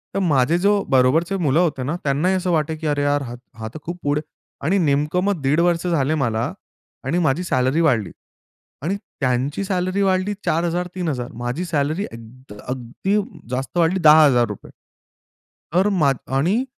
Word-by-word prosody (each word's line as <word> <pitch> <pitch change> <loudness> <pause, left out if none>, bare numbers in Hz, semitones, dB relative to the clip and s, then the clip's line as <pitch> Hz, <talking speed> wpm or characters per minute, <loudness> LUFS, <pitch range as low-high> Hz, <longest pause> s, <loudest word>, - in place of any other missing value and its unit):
तर - - +1
माझे 160 -3 +2
जो 200 +2 +2
बरोबरचे 155 +9 +3
मुलं 155 -2 +2
होते 155 -7 +1
ना, 145 +6 -2
त्यांनाही 150 +7 +1
असं 180 -1 -1
वाटे 160 -1 0
की, 155 0 -4
"अरे 145 -1 0
यार, 145 0 +1
हा 120 -1 -7 0.2
हा 110 - -4
तर - - -7
खूप 175 +1 -5
पुढे" 145 +1 +1 0.4
आणि 185 +6 +2
नेमकं 150 +2 +1
मग 200 -6 0
दीड 140 +4 +2
वर्ष 175 0 +1
झाले 155 -3 +1
मला 115 -6 -1 0.5
आणि 155 +7 0
माझी 160 +1 +1
सॅलरी 130 -1 +1
वाढली 120 - +2 0.7
आणि 180 +6 0 0.2
त्यांची 130 +6 0
सॅलरी 185 0 -1
वाढली 190 +1 +1
4,000-3,000. 170 -5 -1
माझी 120 +9 -3
सॅलरी 160 +3 -1
अगद 115 +2 -12
अगदी 130 - -2 0.3
जास्त 130 +6 -3
वाढली 175 +2 +2
₹10,000. 140 - +4 1.0
तर 190 +3 +4
माझ 155 -9 +2 0.2
आणि 190 - +2
155 Hz, 155 wpm, -21 LUFS, 135-180 Hz, 1.0 s, ₹10,000